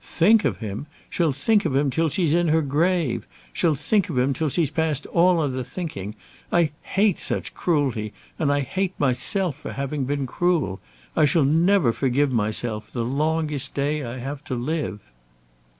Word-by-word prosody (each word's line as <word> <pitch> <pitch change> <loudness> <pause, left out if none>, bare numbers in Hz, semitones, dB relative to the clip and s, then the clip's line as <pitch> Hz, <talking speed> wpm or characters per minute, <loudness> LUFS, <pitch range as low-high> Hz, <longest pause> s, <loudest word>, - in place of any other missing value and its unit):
Think 210 +6 +3
of - - 0
him! 110 +6 -5 0.2
She'll 165 -4 +1
think 205 - +2
of 135 - -1
him 140 0 +2
till 160 +5 +1
she's 160 0 +1
in 175 0 +3
her 160 0 +3
grave. 160 0 0 0.3
She'll 165 -4 +2
think 185 +9 +1
of 145 - -3
him 130 +2 +2
till 155 +3 -1
she's 155 0 0
past 155 -4 0
all 175 0 +3
other 130 -4 -1
thinking. 115 - -6 0.4
I 170 -3 +3
hate 200 -1 +1
such - - -2
cruelty; 135 - 0 0.3
and 145 -3 +2
I 145 0 +2
hate 185 +7 -2
myself 145 +5 0
for 150 - -7
having 140 0 -2
been 140 0 -1
cruel. 155 - 0 0.4
I 155 - +5
shall 145 +1 +3
never 165 -2 +3
forgive 135 +2 +1
myself, 110 -1 -1
the 120 -2 -2
longest 150 +2 -1
day 145 +1 0
I 120 +1 -5
have 135 +3 -6
to 130 - -3
live." 125 -4 -3
145 Hz, 175 wpm, -24 LUFS, 130-170 Hz, 0.4 s, I